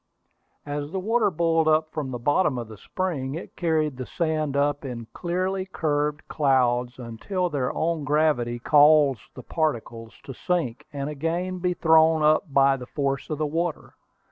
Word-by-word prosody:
As 145 0 -4
the 190 - -2
water 225 +3 +2
boiled 165 -2 +1
up 155 0 +2
from 150 -4 -3
the 125 - -4
bottom 145 +3 +1
of 120 -2 -5
the 110 -1 -11
spring, 150 -8 -3
it 170 - -8
carried 155 -5 0
the 130 - -6
sand 155 -4 -1
up 145 +1 +1
in 120 -4 -6
clearly 185 +2 -2
curved 150 -2 -1
clouds 125 -4 +1
until 150 - -3
their 130 -3 -1
own 165 -1 -1
gravity 145 -5 +1
caused 145 -2 +5
the - - -9
particles 115 -7 -3
to 135 - -8
sink, 140 -5 -2
and 140 -1 -4
again 170 +5 -3
be 180 0 -1
thrown 160 -1 +4
up 155 +2 +3
by 135 0 +4
the 125 -1 -9
force 140 -1 -2
of 155 - -2
the 155 - -1
water. 165 +2 -3
150 Hz, 170 wpm, -25 LUFS, 135-165 Hz, -, caused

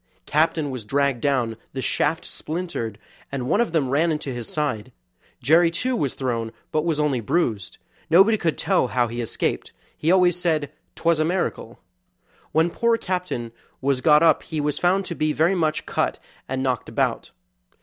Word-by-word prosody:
Captain 155 -1 +1
was 130 -4 -5
dragged 135 +2 0
down, 125 -6 +1 0.2
the 135 - -4
shafts 160 - 0
splintered, 155 - -4 0.3
and 130 -3 -3
one 205 - +3
of 235 - 0
them 155 -5 +1
ran 160 +4 +2
into 150 -3 -3
his 120 -2 -6
side. 135 -9 -2 0.5
Jerry, 165 +3 +5
too, 250 +10 -1
was 140 - -1
thrown, 115 -4 -2 0.2
but 155 - +1
was 160 -3 0
only 145 -4 +1
bruised; 115 - -1 0.3
nobody 195 +7 +6
could 170 -7 -1
tell - - +2
how 125 0 +1
he 120 +1 -4
escaped; 115 - -2 0.2
he 160 - +1
always 180 -1 +4
said 155 -5 0 0.2
'twas 170 -2 +1
a - - +3
miracle. 180 +3 -2 0.7
When 160 +2 +2
poor 235 +3 +2
Captain 180 - -3 0.3
was 135 -1 0
got 150 +1 +5
up 160 -3 +5
he 155 - -5
was 150 0 -1
found 185 +2 +2
to 170 - -4
be 155 -2 0
very 160 +6 +3
much 160 -4 0
cut - - -1 0.3
and 130 0 -2
knocked 130 -3 -1
about. - - -1
150 Hz, 175 wpm, -23 LUFS, 130-170 Hz, 0.7 s, nobody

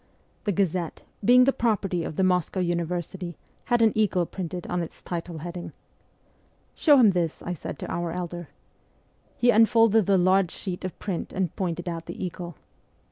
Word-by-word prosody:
The 205 - +2
Gazette, 180 -3 -1 0.2
being 250 +4 +7
the 275 +1 +3
property 195 -7 0
of 155 - -5
the 190 - +1
Moscow 180 0 +1
University, 175 0 -2 0.3
had 240 -2 +3
an 220 - +5
eagle 195 -5 +2
printed 180 0 -5
on 180 0 -1
its 165 - -7
title 170 -1 -5
heading. 175 +2 -6 0.5
' - - -37 0.3
Show 295 -3 +5
him 230 -6 +7
this,' 170 -3 -2
I 180 - -3
said 150 - -6
to - - -6
our 170 -1 -2
elder. 175 -1 -5 0.9
He 245 0 +5
unfolded 225 -2 +5
the 195 -1 +4
large 185 0 +3
sheet 180 +1 -6
of 185 - -5
print 190 -5 -4
and 185 -4 -2
pointed 175 -2 -3
out 165 -1 -4
the - - -4
eagle. 175 -1 -6
180 Hz, 175 wpm, -26 LUFS, 175-200 Hz, 0.9 s, being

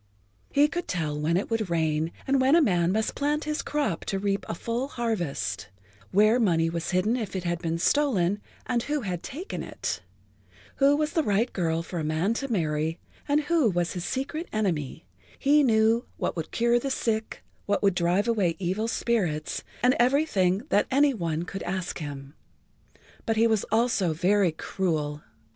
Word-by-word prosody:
He 290 +1 +5
could 350 +3 -4
tell 155 -4 -2
when 165 +3 +2
it 200 - -3
would 220 -4 0
rain 160 -1 0
and 270 -1 +2
when 265 +4 +5
a - - +7
man 175 -7 +2
must 220 +2 0
plant 295 +2 0
his 305 +1 -2
crop 285 - -1
to 195 - -1
reap 195 0 -1
a - - -2
full 235 +8 -2
harvest, 220 - -3 0.4
where 215 +5 +4
money 165 -7 +2
was 170 0 -3
hidden 190 +6 +2
if 220 -6 -4
it 185 - -2
had 175 -1 -1
been 165 -1 -1
stolen 205 -4 +2 0.2
and 240 -1 0
who 295 +3 -2
had 180 -5 -3
taken 340 +9 -6
it, - - -4 0.8
who 280 +1 +5
was 305 +1 -1
the 325 - +3
right 220 -1 +1
girl 165 -2 0
for 170 0 -5
a - - -2
man 155 +7 0
to 275 +2 -4
marry 160 -4 0 0.3
and 290 +1 +3
who 305 -5 +2
was 175 -2 -1
his 180 -3 -4
secret 280 - -3
enemy, 170 -8 -2 0.3
he 290 +2 +4
knew 225 -2 +3
what - - -2
would 165 -2 -4
cure 235 +1 +2
the 275 - -3
sick, 225 -4 -2 0.2
what 205 0 0
would 200 -1 +4
drive 175 +4 +1
away 200 -8 +1
evil 195 +5 -1
spirits 190 -10 -1 0.2
and 250 +1 +5
everything 240 - +2
that 205 - +3
any 280 +1 +4
one 170 -6 -2
could 195 +2 -6
ask 180 0 -3
him. 140 -2 -7 0.9
But 225 -1 +1
he 225 - +5
was 220 -3 +2
also 220 -7 +1
very 185 +2 +2
cruel. 155 -3 -2
200 Hz, 180 wpm, -27 LUFS, 170-245 Hz, 0.9 s, a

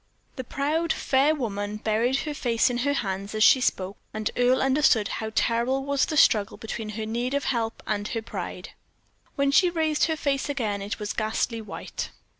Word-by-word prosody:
The 260 - -5
proud, 305 +6 -1
fair 280 +4 +2
woman 205 -5 -3
buried 225 +5 +1
her 300 - -4
face 240 -3 +1
in 240 - -2
her 285 +3 +1
hands 200 -3 -3
as 215 - +3
she 260 - +7
spoke, 190 -4 -1 0.2
and 215 -1 -1
Earle 245 +1 +3
understood 265 -6 +3
how 220 0 -4
terrible 250 +4 +1
was 280 -1 +1
the 310 - -2
struggle 210 -6 +4
between 225 -1 -5
her 220 - -3
need 240 +4 -2
of 280 - 0
help 230 -3 -2
and 205 -1 -2
her 225 - -3
pride. - - -6 0.7
When 280 -1 +2
she 360 +5 +5
raised 315 -3 +1
her 320 -1 -1
face 280 -1 -1
again, 220 -8 -2
it 200 +2 -4
was 210 -1 -4
ghastly 225 +1 -1
white. 215 - -6
240 Hz, 190 wpm, -26 LUFS, 215-280 Hz, 0.7 s, she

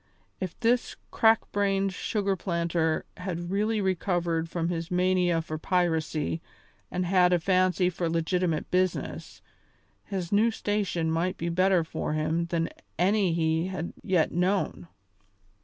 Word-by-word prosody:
If 185 -3 -5
this 240 +1 +1 0.2
crack 225 0 +3
brained 195 -1 +1
sugar 200 +1 -1
planter 170 -3 0
had 175 -1 -4
really 215 +2 +1
recovered 175 -3 0
from 170 -1 -1
his 165 -1 -3
mania 180 -2 +2
for 155 -1 -5
piracy 160 -3 0 0.5
and 180 0 -2
had 180 0 +4
a 175 - +4
fancy 185 +1 +2
for 175 -1 -1
legitimate 165 0 0
business, 185 0 -1 0.6
his 185 -4 -4
new 215 +3 +4
station 200 -7 -1
might 175 +3 0
be 170 - -2
better 185 0 +3
for 160 -1 -3
him 160 +2 0
than 165 -1 -1 0.3
any 190 +1 +3
he 160 +1 +1
had 185 -3 -4
yet 180 -4 +1
known. 180 +1 0
180 Hz, 135 wpm, -27 LUFS, 165-190 Hz, 0.6 s, had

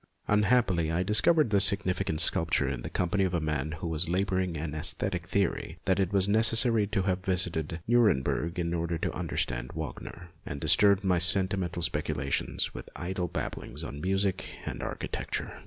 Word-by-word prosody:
Unhappily 105 -6 +2
I 85 +2 0
discovered 110 - +3
this 100 -1 +7
signifi 95 -1 -2
cant 80 - 0
sepulchre 80 -3 +2
in 65 -3 -3
the - - -6
company 95 +2 0
of 90 -1 0
a - - +1
man 75 -1 -2
who 80 +1 -5
was 80 +1 +3
labouring 95 -2 -1
an 75 0 -4
aesthetic 90 +3 0
theory 100 -1 -1
that 95 0 +1
it 95 -2 0
was 100 -1 +2
necessary 115 +1 +3
to 95 -1 -1
have 95 -1 -1
visited 85 -4 -1
Nuremberg 90 - +2
in 85 -1 -2
order 85 0 -2
to - - -3
understand - - -3
Wagner, 85 -1 -7
and 70 - -6
disturbed 100 +5 +4
my 90 -3 +2
sentimental 90 -1 +1
speculations 70 -3 -2
with - - -9
idle 90 0 -3
babblings - - -5
on 70 - -7
music 95 +1 -1
and - - -5
architecture. - - -4
90 Hz, 170 wpm, -28 LUFS, 80-100 Hz, -, this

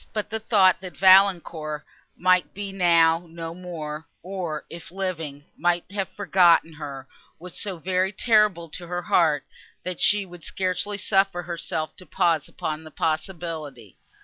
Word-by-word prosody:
But 215 0 -3
the 220 - -2
thought 200 -5 +4
that 185 -2 -9
Valancourt 175 -6 +4 0.3
might 185 -3 +2
be 200 0 -5
now 170 -2 +3
no 165 0 -6
more, 160 -4 -7 0.2
or, 180 -4 -4
if 170 - -10
living, 165 -6 -4
might 175 +1 +1
have 195 -2 -2
forgotten 175 -5 +3
her, 140 -3 -8 0.3
was 180 +1 -7
so 195 -3 -2
very 185 +2 0
terrible 210 -5 +3
to 175 +3 -8
her 175 +1 -3
heart, 155 -5 +2 0.4
that 180 -1 -5
she 205 -1 +4
would 175 -2 -13
scarcely 190 +2 -2
suffer 195 -2 +1
herself 165 -2 -4
to 185 - -13
pause 160 -2 +1
upon 155 0 -5
the 155 - -10
possibility. 155 - -4
175 Hz, 150 wpm, -24 LUFS, 160-190 Hz, 0.4 s, thought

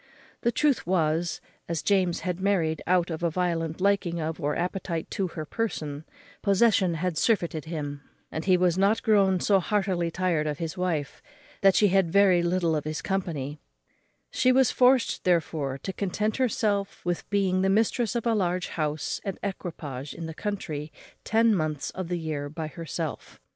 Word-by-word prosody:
The 235 - +2
truth 285 - +1
was, 170 -1 +1 0.3
as 170 -2 -2
James 185 -4 +2
had 180 0 -3
married 180 -5 +1
out 180 -1 +2
of 160 - -4
a 170 - +2
violent 165 -1 -1
liking 190 -3 +1
of, 160 +1 -3
or 145 0 0
appetite 175 -2 -3
to, 195 - -1
her 160 -2 -6
person, 155 -7 -3 0.4
possession 200 -3 +3
had 165 -1 -1
surfeited 170 -9 +1
him, 145 -3 -5 0.3
and 160 - -3
he 185 -1 +5
was 180 0 +2
now 200 +3 +4
grown 200 -4 +3
so 195 +1 +3
heartily 190 -3 0
tired 170 -3 0
of 150 -1 -2
his 165 0 -4
wife, 175 -6 -2 0.4
that 195 -2 +5
she 205 - +5
had 190 -3 +2
very 195 -2 +5
little 170 -1 +1
of 150 - -1
his 155 0 -4
company; 155 -7 -3 0.7
she 255 - +3
was 260 -1 +4
forced 255 -1 +3
therefore 155 -6 0
to 190 +8 -5
content 210 +3 -1
herself 205 -7 0
with 175 -1 -2
being 190 -2 +2
the 190 - +2
mistress 225 +3 +1
of 235 - -1
a 230 - +3
large 180 -3 0
house 150 -2 -2
and 195 - -4
equipage 155 -8 -5
in 165 - -6
the 160 - -6
country 160 -6 -4 0.3
ten 225 0 +3
months 155 -6 -1
in 185 -2 -4
the 175 0 -1
year 155 -3 -3
by 155 +2 -5
herself. 160 0 -6
180 Hz, 175 wpm, -27 LUFS, 160-200 Hz, 0.7 s, he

